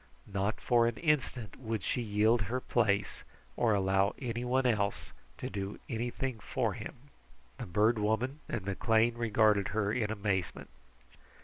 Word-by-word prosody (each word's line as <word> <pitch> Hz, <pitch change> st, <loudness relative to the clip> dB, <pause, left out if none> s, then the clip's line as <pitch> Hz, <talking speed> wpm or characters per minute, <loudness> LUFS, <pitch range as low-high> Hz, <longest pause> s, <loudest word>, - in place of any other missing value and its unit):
Not 100 Hz, +2 st, -2 dB
for 120 Hz, -2 st, +3 dB
an 120 Hz, -, -2 dB
instant 135 Hz, -, -1 dB
would 110 Hz, -5 st, -3 dB
she 125 Hz, -, -1 dB
yield 110 Hz, +1 st, +2 dB
her 115 Hz, +6 st, -1 dB
place, 105 Hz, -5 st, 0 dB, 0.3 s
or 115 Hz, -3 st, +3 dB
allow 95 Hz, +1 st, +2 dB
anyone 125 Hz, +1 st, -1 dB
else 105 Hz, -4 st, 0 dB, 0.3 s
to -, -, -4 dB
do 100 Hz, 0 st, -4 dB
anything 120 Hz, 0 st, -3 dB
for -, -, -1 dB
him. -, -, -7 dB, 0.6 s
The -, -, -5 dB
Bird 105 Hz, +5 st, +3 dB
Woman 110 Hz, +7 st, 0 dB
and 110 Hz, -5 st, -3 dB
McLean 110 Hz, +4 st, +2 dB
regarded 110 Hz, -3 st, +3 dB
her 105 Hz, -1 st, 0 dB
in 110 Hz, -3 st, 0 dB
amazement. 100 Hz, -5 st, -2 dB
110 Hz, 140 wpm, -32 LUFS, 100-120 Hz, 0.6 s, for